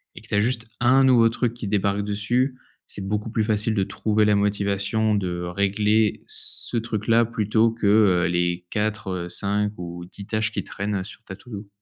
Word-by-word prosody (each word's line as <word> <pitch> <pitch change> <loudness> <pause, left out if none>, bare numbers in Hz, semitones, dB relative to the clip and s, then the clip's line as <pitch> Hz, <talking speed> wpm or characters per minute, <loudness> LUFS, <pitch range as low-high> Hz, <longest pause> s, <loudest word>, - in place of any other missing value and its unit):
et - - -10
que - - -16
tu - - -9
as - - +4
juste 115 +1 -1
un 130 +3 +4
nouveau 120 -3 +5
truc 115 0 -2
qui 120 -3 -6
débarque 100 0 0
dessus, 120 +6 -1 0.3
c'est 100 - -6
beaucoup 105 +2 -2
plus 110 -1 0
facile 110 0 0
de 100 -3 +1
trouver 105 +2 0
la 105 0 +3
motivation 100 +1 0
de 90 -3 -2
régler, 100 +4 0
ce - - +4
truc-là 115 0 +1
plutôt 110 0 +1
que, 115 -2 -2
heu 100 -4 +4
les 90 0 -1
4 110 0 -2
heu, 90 -1 -4
5 105 +3 -1
ou 85 0 -7
10 100 +2 -10
tâches 110 0 -1
qui - - -3
traînent 100 -1 -3
sur 110 +4 -12
ta 95 - -9
to 120 +6 -18
do. 100 -1 -7
105 Hz, 200 wpm, -23 LUFS, 100-110 Hz, 0.3 s, nouveau